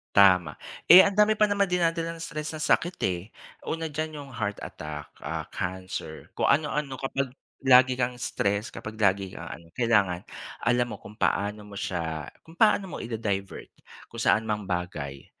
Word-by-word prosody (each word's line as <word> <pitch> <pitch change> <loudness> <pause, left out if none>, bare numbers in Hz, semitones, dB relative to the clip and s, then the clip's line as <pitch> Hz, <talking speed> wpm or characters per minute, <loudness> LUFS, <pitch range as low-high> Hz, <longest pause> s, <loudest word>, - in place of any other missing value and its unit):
Tama. 90 -6 +6 0.3
Eh, 185 +2 +11
ang 200 - +2
dami 210 +1 +5
pa 215 - +4
naman 200 -1 +2
dinadalang 165 -2 0
stress 155 0 -5
ng 155 - -4
sakit, 175 +2 +2
eh. 90 -2 -2 0.5
Una 160 -1 -3
diyan 155 +1 -3
yung 140 - -13
heart 105 -4 -3
attack, 75 -1 -7
ah, - - -4
cancer 95 +1 -5
kung - - +1
ano-ano 145 -1 +1
kapag 135 0 -3 0.3
lagi 130 -1 +6
kang 125 0 0
stress 100 -1 -1
kapag 110 - -8
lagi 95 -1 +2
kang - - -8
ano 85 +5 -11
kailangan 105 -7 +2 0.4
alam 120 +1 +2
mo - - -10
kung 105 - -12
paano 105 -1 0
mo 105 - -13
siya 80 -5 -3 0.2
kung 160 - -14
paano 200 +1 +4
mo 180 - -7
i-da-divert 105 -4 -4 0.3
kung - - -8
saan 110 - +3
mang 105 -3 -3
bagay 75 -7 -4
115 Hz, 170 wpm, -27 LUFS, 95-155 Hz, 0.5 s, Eh